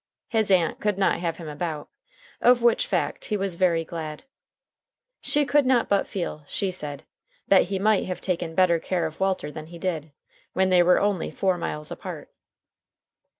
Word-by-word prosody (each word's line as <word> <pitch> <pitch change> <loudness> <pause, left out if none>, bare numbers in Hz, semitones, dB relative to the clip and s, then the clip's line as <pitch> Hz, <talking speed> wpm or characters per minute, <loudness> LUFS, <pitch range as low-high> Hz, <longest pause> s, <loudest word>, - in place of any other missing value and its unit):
His 220 -3 +1
aunt 180 -4 +2
could 210 -2 0
not 195 -3 +2
have 170 -2 -2
him 165 - -8
about, 150 0 -4 0.5
of 245 -1 +5
which 240 - +3
fact - - -1
he 210 - -1
was 195 -2 -2
very 170 -2 +1
glad. 155 -2 -6 1.0
She 295 0 +2
could 290 +1 +3
not 250 -3 +3
but 200 -1 +2
feel, 170 -5 -4
she 195 -2 -1
said, 150 -5 -4 0.4
that 195 - +5
he 195 +2 -2
might 210 +1 +2
have 180 - -4
taken 170 -3 -3
better 175 -2 +4
care 175 0 -1
of 160 0 -6
Walter 190 -6 0
than 155 +1 -8
he 170 +1 -10
did, 165 -4 -3 0.4
when 190 0 +2
they 180 -1 +5
were 180 +1 +5
only 200 -4 0
four 190 -2 0
miles 150 -3 -4
apart. - - -7
180 Hz, 180 wpm, -25 LUFS, 165-200 Hz, 1.0 s, of